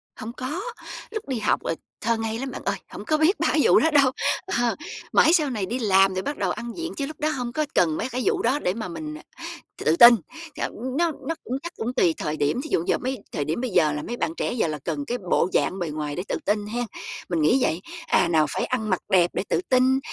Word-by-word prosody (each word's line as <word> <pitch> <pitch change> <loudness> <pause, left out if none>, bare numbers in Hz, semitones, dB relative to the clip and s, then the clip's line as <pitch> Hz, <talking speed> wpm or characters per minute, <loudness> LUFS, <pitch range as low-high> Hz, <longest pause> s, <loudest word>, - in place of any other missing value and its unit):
Hông 225 +2 -6
có, 265 +9 -4 0.5
lúc 435 -9 -5
đi 255 -4 -2
học, 210 - +1
ờ, 165 - -1 0.3
thơ 230 +1 +1
ngây 225 +1 -3
lắm 270 0 -4
bạn - - -7
ơi, - - +1
hổng - - -9
có 310 -1 +2
biết 325 +6 +3
ba - - +2
cái 310 - +3
vụ - - +6
đó 320 - +2
đâu, 280 -3 +5 0.3
ờ, 240 -9 0 0.4
mãi 320 - +6
sau 305 -5 +3
này 215 -7 -2
đi 245 +6 -3
làm 195 -3 +4
rồi 185 - -1
bắt 290 - -3
đầu 190 -3 0
ăn 235 0 -5
diện 335 0 -4
chứ 280 - -1
lúc 305 +2 -9
đó 305 +1 +1
hông 250 -5 -3
có 305 +1 0
cần 160 -3 +3
mấy 255 - -2
cái 255 +1 -2
vụ 400 -2 +2
đó 290 -3 +2
để 180 - 0
mà 220 -3 -5
mình, 155 -3 -6
à, - - -14 0.6
tự 155 - +4
tin. 235 +4 +10 0.4
Thận - - -3 0.2
nó 340 0 +2 0.2
nó 330 - -1
cũng 255 +2 -3
chắc 345 +1 -6
cũng 240 +3 -3
tùy 170 -8 +3
thời 155 +1 -3
điểm, 150 - +1
thí 310 - -7
dụ 165 - +2
giờ - - +3
mấy 260 +1 -3
thời 145 -4 -2
điểm 160 +10 -2
bây 255 - -1
giờ 155 -6 +3
là 150 - -3
mấy 240 - -5
bạn - - -1
trẻ - - -1
giờ 235 -8 +1
là 150 -1 -3
cần 145 -1 -3
cái 245 - -1
bộ 180 - +3
dạng 190 - +1
bề 175 - -2
ngoài 150 -1 -4
để 180 - -3
tự - - -1
tin 205 0 +1
hén, 240 +3 -2 0.5
mình 170 -3 0
nghĩ 155 - +4
vậy. 170 -5 +1 0.3
À, - - +3
nào 160 -2 +3
phải - - -1
ăn 220 -4 -2
mặc 185 - +1
đẹp 180 -2 +4
để - - -1
tự - - +1
tin, 260 +1 +4
235 Hz, 270 wpm, -24 LUFS, 175-270 Hz, 0.6 s, tin